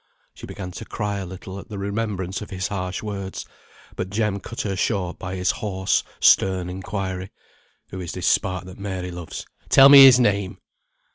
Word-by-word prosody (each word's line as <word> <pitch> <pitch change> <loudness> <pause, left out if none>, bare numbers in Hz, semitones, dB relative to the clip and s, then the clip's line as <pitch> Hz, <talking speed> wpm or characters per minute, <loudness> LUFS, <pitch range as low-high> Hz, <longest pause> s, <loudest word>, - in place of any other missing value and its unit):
She - - -11
began 90 -3 -7
to - - -8
cry 105 -1 -3
a 95 - -6
little 95 +1 -8
at - - -12
the 105 - -6
remembrance 100 -2 -3
of 105 - -8
his 95 -2 -3
harsh 95 -1 -4
words; 100 -2 -5 0.5
but 95 - -4
Jem 105 -1 -1
cut 115 +4 -6
her 100 -2 -2
short 95 -2 -1
by 90 +1 -5
his 90 0 +1
hoarse, 95 -4 -1 0.2
stern 95 -2 +3
inquiry, 95 0 -4 0.6
"Who 95 - -6
is 85 - -5
this - - -4
spark 95 0 +1
that 95 +1 -11
Mary 95 -3 -4
loves? 85 -2 -7 0.2
Tell 135 +1 +8
me 140 -1 +11
his 130 -1 +8
name!" 100 -5 +1
95 Hz, 185 wpm, -23 LUFS, 95-105 Hz, 0.6 s, me